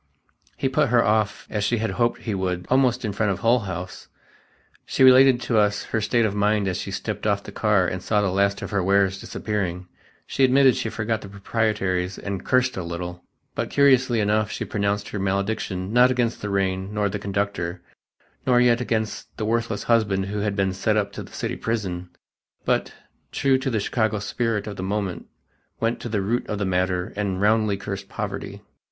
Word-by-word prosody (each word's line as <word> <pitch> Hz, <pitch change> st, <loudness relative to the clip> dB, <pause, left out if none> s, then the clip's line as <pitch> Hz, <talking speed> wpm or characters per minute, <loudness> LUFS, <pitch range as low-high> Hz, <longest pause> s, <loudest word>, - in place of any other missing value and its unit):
He -, -, 0 dB
put 140 Hz, +2 st, +2 dB
her 120 Hz, 0 st, +4 dB
off, 105 Hz, -1 st, +1 dB
as 105 Hz, -1 st, -1 dB
she 120 Hz, +3 st, +1 dB
had 115 Hz, 0 st, -1 dB
hoped 120 Hz, 0 st, 0 dB
he 110 Hz, -, -3 dB
would, 90 Hz, -2 st, -2 dB
almost 125 Hz, -2 st, +3 dB
in 105 Hz, -, -2 dB
front 105 Hz, +1 st, +1 dB
of 95 Hz, -, -4 dB
Hull 120 Hz, +2 st, +4 dB
House. 90 Hz, -3 st, -6 dB, 0.8 s
She -, -, +1 dB
related 130 Hz, -1 st, +7 dB
to 115 Hz, -3 st, +1 dB
us 105 Hz, -1 st, +1 dB
her 110 Hz, -, -2 dB
state 115 Hz, +2 st, +2 dB
of 105 Hz, -, 0 dB
mind 105 Hz, 0 st, +1 dB
as 90 Hz, -1 st, -1 dB
she 95 Hz, -, -5 dB
stepped 105 Hz, +2 st, -3 dB
off 100 Hz, -1 st, +1 dB
the -, -, -9 dB
car 105 Hz, -4 st, +2 dB
and 90 Hz, +1 st, -3 dB
saw 105 Hz, +3 st, +1 dB
the 100 Hz, -2 st, +1 dB
last 100 Hz, +1 st, +1 dB
of -, -, -6 dB
her 100 Hz, -2 st, +1 dB
wares 95 Hz, 0 st, +2 dB
disappearing; 95 Hz, -4 st, -3 dB, 0.4 s
she 135 Hz, -, 0 dB
admitted 130 Hz, 0 st, +5 dB
she 110 Hz, -, -2 dB
forgot 110 Hz, 0 st, -2 dB
the 100 Hz, -, -9 dB
proprieties 100 Hz, -3 st, -1 dB
and 100 Hz, -2 st, -5 dB
"cursed 125 Hz, -2 st, +2 dB
a 95 Hz, -, -2 dB
little," 85 Hz, +1 st, -6 dB, 0.3 s
but, -, -, -3 dB
curiously 130 Hz, -4 st, +4 dB
enough, 105 Hz, 0 st, +1 dB
she -, -, -4 dB
pronounced 100 Hz, -1 st, -1 dB
her 105 Hz, -, -4 dB
malediction, 100 Hz, 0 st, -2 dB
not 125 Hz, +1 st, +6 dB
against 120 Hz, -2 st, 0 dB
the 105 Hz, -, -3 dB
rain 95 Hz, 0 st, -1 dB
nor 105 Hz, -1 st, 0 dB
the 105 Hz, +1 st, -3 dB
conductor, 100 Hz, -3 st, -3 dB, 0.6 s
nor 125 Hz, -2 st, +4 dB
yet 120 Hz, -1 st, +4 dB
against 110 Hz, -3 st, -3 dB
the 110 Hz, -, -2 dB
worthless 115 Hz, -1 st, -1 dB
husband 105 Hz, -5 st, +2 dB
who 105 Hz, +1 st, -3 dB
had 100 Hz, -1 st, -1 dB
been 95 Hz, -2 st, +1 dB
set 105 Hz, +3 st, 0 dB
up 105 Hz, -1 st, 0 dB
to -, -, -7 dB
the -, -, -11 dB
city -, -, -3 dB
prison, 95 Hz, -6 st, -3 dB, 0.6 s
but, -, -, +1 dB, 0.4 s
true 135 Hz, -1 st, +2 dB
to 135 Hz, -, -2 dB
the 115 Hz, -4 st, 0 dB
Chicago 110 Hz, +1 st, 0 dB
spirit 105 Hz, +1 st, -1 dB
of 105 Hz, -2 st, -6 dB
the -, -, -4 dB
moment, 95 Hz, -2 st, -3 dB, 0.5 s
went 115 Hz, +1 st, 0 dB
to 120 Hz, -, -6 dB
the 105 Hz, -3 st, -1 dB
root 115 Hz, +5 st, -1 dB
of 105 Hz, -, -3 dB
the 100 Hz, -, -1 dB
matter 90 Hz, -1 st, 0 dB
and 100 Hz, -2 st, -2 dB
roundly 105 Hz, 0 st, +2 dB
"cursed 100 Hz, -, -6 dB
poverty." -, -, -5 dB
105 Hz, 200 wpm, -24 LUFS, 95-115 Hz, 0.8 s, related